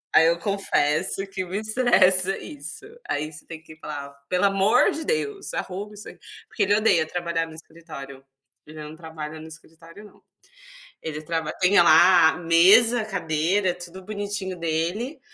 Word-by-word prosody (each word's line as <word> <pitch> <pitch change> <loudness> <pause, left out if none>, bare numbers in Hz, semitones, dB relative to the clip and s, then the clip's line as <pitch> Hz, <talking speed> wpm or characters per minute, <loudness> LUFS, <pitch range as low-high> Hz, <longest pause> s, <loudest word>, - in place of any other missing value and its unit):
aí 160 - +7
eu 170 0 +1
confesso 195 -1 -1
que 190 -1 -4
me 190 +4 -4
estressa 215 -5 +2
isso, 145 - -9 0.2
aí 155 +2 -3
você 150 - -13
tem 160 -1 -9
que 160 -1 -14
falar: 145 -2 -7 0.2
"Pelo 180 +2 +2
amor 200 +5 +3
de 320 - -5
Deus, 425 -4 -3
arruma 200 +3 -5
isso 210 +1 -11
aqui", - - -15 0.3
porque 210 - -1
ele 205 +1 +3
odeia 170 -8 +3
trabalhar 170 -1 -2
no 160 - -12
escritório, 150 -5 -11 0.4
ele 155 0 -10
não 150 +1 -9
trabalha 160 -1 -8
no 160 - -10
escritório, 165 +4 -15
não, - - -19 0.8
ele 155 -1 -5
traba 160 -1 -3
tem 185 +2 +3
lá 170 0 +6
a 160 - -7
mesa, 195 +8 +5
a - - -5
cadeira, 180 0 0
tudo 180 +1 -11
bonitinho 205 -2 -4
dele, 175 - -2
175 Hz, 165 wpm, -24 LUFS, 160-200 Hz, 0.8 s, aí